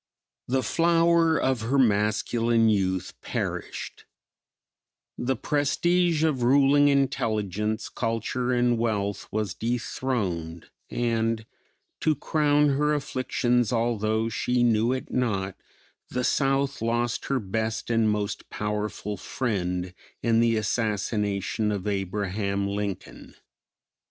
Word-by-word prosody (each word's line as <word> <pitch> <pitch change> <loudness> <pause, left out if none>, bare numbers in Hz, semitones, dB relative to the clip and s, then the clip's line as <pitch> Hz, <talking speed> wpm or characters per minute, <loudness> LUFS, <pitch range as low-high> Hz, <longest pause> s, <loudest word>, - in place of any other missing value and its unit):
The 130 +1 +1
flower 165 +3 +3
of 130 -3 0
her 120 +5 0
masculine 115 0 +2
youth 95 -3 0
perished; - - -4 1.1
the 130 +2 -1
prestige 160 +5 +1
of 150 -6 +1
ruling 140 +3 +5
intelligence, 110 -6 0
culture 120 +2 -2
and 120 -1 +2
wealth 100 -4 -1
was 105 -3 -1
dethroned 105 -8 -3 0.2
and, 115 -2 0 0.5
to 155 -1 +2
crown 150 0 +2
her 150 +2 +2
afflictions 125 -4 0
although 110 -2 0
she 125 +2 0
knew 115 0 +3
it 130 0 -3
not, 100 -7 -1 0.5
the 125 - -2
South 135 0 +1
lost 120 +1 -1
her 135 -1 0
best 110 +3 -2
and 115 -2 +3
most 105 -1 -2
powerful 105 -1 -3
friend 90 -7 -2 0.3
in 115 -1 +3
the 115 -1 +3
assassination 105 -1 -1
of 100 -3 -3
Abraham 100 0 -1
Lincoln. 100 -1 -5
115 Hz, 105 wpm, -26 LUFS, 105-130 Hz, 1.1 s, ruling